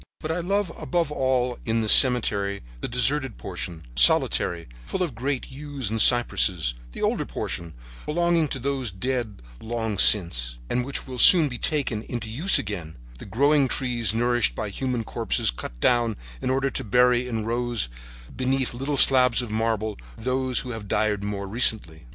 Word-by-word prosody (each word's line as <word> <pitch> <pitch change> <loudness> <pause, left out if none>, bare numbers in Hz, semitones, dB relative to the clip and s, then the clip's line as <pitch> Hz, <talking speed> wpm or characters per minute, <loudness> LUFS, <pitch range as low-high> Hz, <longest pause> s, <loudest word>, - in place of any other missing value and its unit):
"But 155 - -4
I 170 - -2
love 195 +1 -1
above 170 -4 -1
all 130 -3 0
in 115 0 0
this 110 - +4
cemetery 105 -6 +4 0.2
the - - -3
deserted 130 +1 0
portion, 90 -3 -6
solitary, 85 +5 +3 0.2
full 185 - -2
of 165 -7 -4
great 130 +4 -3
yews 140 -5 -5
and 110 -1 +1
cypresses, 95 - +3 0.2
the - - -5
older - - 0
portion, 85 -2 -5 0.3
belonging 170 0 +1
to 135 - -4
those 135 -1 -2
dead 110 - -4 0.2
long 110 -3 -4
since, - - +2
and 125 - 0
which 135 +2 -4
will 130 -2 -7
soon 165 -1 +7
be 125 -2 -7
taken 135 -8 -1
into 115 -1 -6
use 160 - +2
again; 85 -8 -5 0.2
the - - -10
growing 140 +6 +2
trees 120 -4 -1
nourished 120 +2 +1
by 105 - -4
the - - -11
human 125 -1 -2
corpses - - 0
cut - - -9
down 120 - +2 0.3
in - - -2
order 135 +1 0
to - - -3
bury 125 +2 +3
in 115 -3 -3
rows 120 - -1 0.5
beneath 130 0 -1
little 135 +4 -3
slabs 125 -2 +5
of 115 - -7
marble 110 -1 -2 0.2
those 130 +1 -1
who 125 - -7
have 110 -3 -7
died 105 0 0
more 100 -1 -4
recently. 95 - -1
120 Hz, 170 wpm, -24 LUFS, 105-135 Hz, 0.5 s, soon